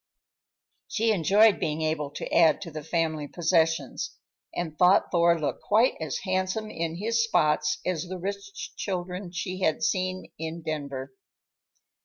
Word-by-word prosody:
She 225 0 +1
enjoyed 205 +3 +5
being 155 +1 -1
able 155 -2 -1
to - - -5
add 165 -2 +5
to 170 -4 -7
the 155 0 -6
family 160 -2 -1
possessions, 165 -4 0 0.4
and 165 -3 -3
thought 180 +4 +4
Thor 170 -1 +4
looked 150 - -2
quite 225 +5 +3
as 160 -2 -3
handsome 190 +3 -1
in 165 0 -3
his 230 +5 +1
spots 150 -7 +2
as 180 -2 -1
the 185 +1 -6
rich 200 +2 -6
children 180 -1 -4
she 185 +1 -4
had 160 -4 +1
seen 185 0 -1
in 160 +1 -5
Denver. 140 -4 -4
170 Hz, 145 wpm, -27 LUFS, 155-190 Hz, 0.4 s, enjoyed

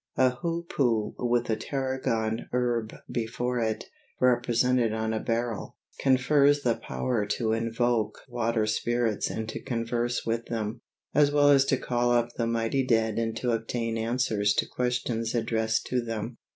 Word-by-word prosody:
A 130 -1 +5
hoopoo 140 -7 -1
with 120 -1 +1
a - - +2
tarragon 125 -4 -2
herb 120 -3 0 0.2
before 125 +1 -2
it, 110 -1 -1 0.3
represented 120 -1 +2
on 110 0 -1
a 110 - 0
beryl, 115 -1 -2 0.2
confers 140 +2 +4
the 120 - +3
power 105 - -2
to 110 +1 0
invoke 115 0 0
water 115 -2 0
spirits 115 0 0
and 110 0 -4
to - - -5
converse 120 -1 -2
with 115 0 -1
them, 115 0 -3 0.3
as 145 -1 +4
well 145 0 +5
as 135 -1 +5
to 135 -1 +2
call 120 -1 0
up 120 -1 +2
the 115 - -1
mighty 115 +3 0
dead 115 -3 +1
and 115 -1 -1
to 125 0 0
obtain 115 0 -2
answers 110 -3 +1
to - - +2
questions 125 -2 -1
addressed 110 -1 0
to 125 -1 0
them. 115 0 -5
120 Hz, 150 wpm, -27 LUFS, 115-125 Hz, 0.3 s, A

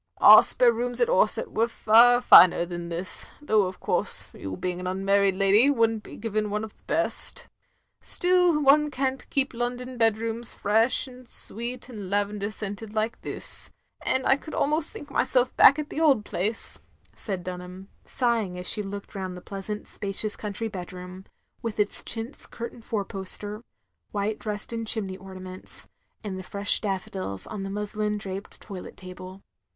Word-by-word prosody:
Our - - +9
spare 245 -2 +4
rooms 245 +1 -2
at 480 - +2
Orsett - - +2
was 230 +2 0
far 240 +3 +5
finer 180 -7 +7
than 175 -1 -6
this, 175 +2 -1
though 215 -9 +2
of 185 - -8
course, - - 0
you 95 -1 -7
being 180 -1 -3
an 180 - -5
tinmarried 195 +1 +1
lady 205 +7 +4
would 230 -5 +3
n't 220 -1 -5
be - - -12
given 215 -2 -2
one 210 +1 -2
of 220 - -9
the - - -34
best. - - +2 0.5
Still, 360 -3 +3
one 300 +2 +5
can't 265 -1 -3
keep 275 -1 0
London 245 +1 -4
bedrooms 225 +1 0
fresh 225 +7 +3
and 255 -1 -13
sweet 240 +3 -5
and 210 -7 -8
lavender 205 0 -1
scented 210 +1 -7
like 220 +2 -2
this, - - +1 0.3
and 260 - 0
I 270 - +4
could 310 - -9
al - - +2
most 305 +2 +1
think 290 -1 -9
myself 255 -2 +1
back 280 - +7
at 300 -1 -5
the 315 - -3
old 270 -10 +3
place," 215 +5 -1 0.4
said 190 -4 -5
Dunham, 180 +1 -8 0.2
sighing 230 -7 -1
as 180 - -3
she 210 - +3
looked 200 0 -7
rotmd 190 -2 -5
the 180 - -9
pleasant 200 +2 -7
spacious 205 +1 -1
coimtry 215 +1 -5
bedroom; 180 0 -8 0.4
with 230 -3 -5
its 205 0 0
chintz 230 +4 -1
curtained 235 0 -8
four 205 -3 -2
poster, 205 +3 -5 0.5
white 205 +1 -2
Dresden 215 +2 -5
chimney 210 -4 -1
ornaments, 185 -1 -11 0.4
and 195 -3 -5
the - - -5
fresh 200 +2 +2
daflEodils 190 - -4
on 210 -2 -5
the 195 - -5
muslin 210 +1 -3
draped 195 0 -7
toilet 195 -4 -9
table. 185 +1 -11
210 Hz, 170 wpm, -26 LUFS, 195-240 Hz, 0.5 s, Our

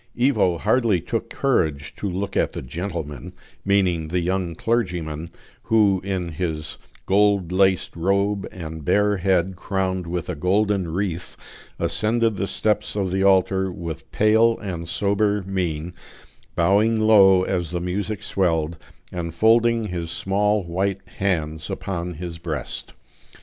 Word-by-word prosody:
Ivo 120 -9 +3
hardly 110 0 +2
took - - -3
courage 80 - 0
to 100 - -3
look 100 +2 -3
at - - +1
the - - -5
"gentleman," 80 +1 -5 0.3
meaning 95 -5 +2
the 90 +3 0
young 90 -1 -1
clergyman, 85 -8 -2 0.4
who, 105 -4 +3
in 95 -3 -2
his 80 -2 -3 0.3
gold 100 -3 +3
laced 95 0 +2
robe, 100 +3 0
and 80 -3 -7
bare 105 +6 +2
head 95 0 +1
crowned 95 -1 -2
with 85 0 -3
a 90 - -2
golden 95 +3 +1
wreath, 90 -1 -3 0.4
ascended 115 -1 +1
the 100 - -1
steps 105 0 0
of 95 -3 -1
the 95 +1 0
altar 95 0 +3
with 85 -5 -7
pale 110 +2 +4
and 85 -4 -5
sober 100 0 +1
mien, 90 -3 -2 0.6
bowing 105 +6 +3
low 100 -4 +6
as 90 -4 -1
the 90 +1 -2
music 95 +3 -3
swelled, 85 -3 0 0.3
and 85 -2 -4
folding 115 +2 +3
his 85 -2 -4
small 105 +3 +1
white 95 +3 -2
hands 80 -5 -1
upon 90 -2 -4
his 85 0 -6
breast. 80 -5 -4
95 Hz, 135 wpm, -23 LUFS, 85-100 Hz, 0.6 s, low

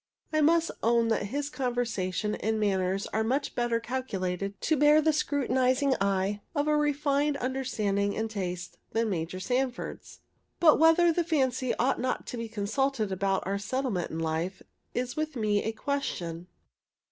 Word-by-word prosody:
I 310 - +3
must 330 +2 +3
own 230 0 +3
that 220 -2 0
his 285 +6 -3
conversation 220 - -1
and 220 +1 -1
manners 195 -1 0
are 220 - +1
much 265 +6 -1
better 240 -1 0
calculated 200 -6 -3
to 315 - +2
bear 295 +1 +6
the 310 0 +3
scrutinizing 265 -2 +2
eye 200 +1 0
of 290 0 +1
a 300 - +3
refined 290 -1 +1
understanding 235 -7 -1
and 220 - 0
taste 180 -4 -5
than 225 -1 +1
Major 170 +1 -3
Sanford's. 250 +5 -3 0.4
But 310 -4 +6
whether 325 +1 +5
the 345 - +1
fancy 260 -6 0
ought 255 +2 +1
not 255 - -1
to 245 - -6
be 230 -1 -4
consulted 220 +1 -1
about 195 +1 0
our 200 +2 -1
settlement 215 -3 -2
in 160 - -5
life, 165 +3 -2 0.3
is 250 0 -2
with 310 -1 -2
me 210 -3 +1
a 220 - -1
question. 180 -10 -3
235 Hz, 160 wpm, -28 LUFS, 200-280 Hz, 0.4 s, bear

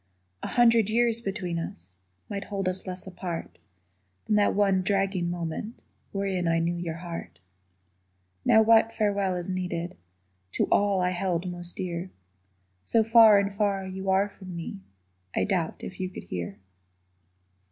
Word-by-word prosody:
A - - -3
hundred 230 -3 +4
years 235 0 +2
between 190 -5 -3
us 90 - -7 0.3
Might 200 0 -4
hold 195 -2 -3
us 185 +1 -3
less 185 0 -5
apart 180 -3 -6 0.7
Than 210 - +1
that 205 - +3
one 195 -2 +3
dragging 195 -2 0
moment 175 +6 -4 0.3
Wherein 195 -3 -1
I 165 0 +3
knew 165 +1 +1
your 170 -2 -4
heart. 165 - -7 1.0
Now 220 - +6
what 225 0 +5
farewell 200 -4 0
is 180 +1 -3
needed 180 -1 -3 0.6
To - - +2
all 200 -2 +3
I 180 0 +2
held 180 -1 -1
most 175 -1 -5
dear, 175 0 -4 0.7
So 225 - +2
far 225 -1 +8
and 200 0 +1
far 200 -2 0
you 190 +1 -4
are 190 +2 +3
from 190 -3 -10
me 165 -11 -6 0.6
I - - +2
doubt 180 -6 0
if 185 - -8
you 185 -1 -2
could - - -9
hear. 90 +2 -5
190 Hz, 150 wpm, -27 LUFS, 175-205 Hz, 1.0 s, far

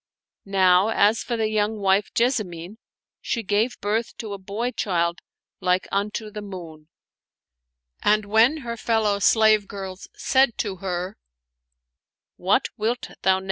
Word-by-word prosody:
Now 190 0 +4
as 220 0 +3
for 235 - -3
the 220 -1 +1
young 215 0 0
wife 195 0 +2
Jessamine, 215 -5 -1 0.4
she 230 - -2
gave 215 +5 0
birth 220 +3 -1
to 215 -3 -6
a 200 - -6
boy 210 +6 -3
child 170 -6 -1 0.4
like 180 0 +1
unto 210 +2 -2
the 210 - -6
moon; 170 -6 -9 1.1
and 210 0 +3
when 225 +8 +4
her 235 0 -4
fellow 220 -3 +1
slave 215 0 +4
girls 190 -2 -7
said 265 -3 +2
to 200 -3 -3
her, 185 +1 -4 0.6
" - - -59 0.5
What 195 +8 +1
wilt 235 +3 -2
thou 190 - +4
name - - +1
him - - -4
205 Hz, 145 wpm, -24 LUFS, 190-220 Hz, 1.1 s, Now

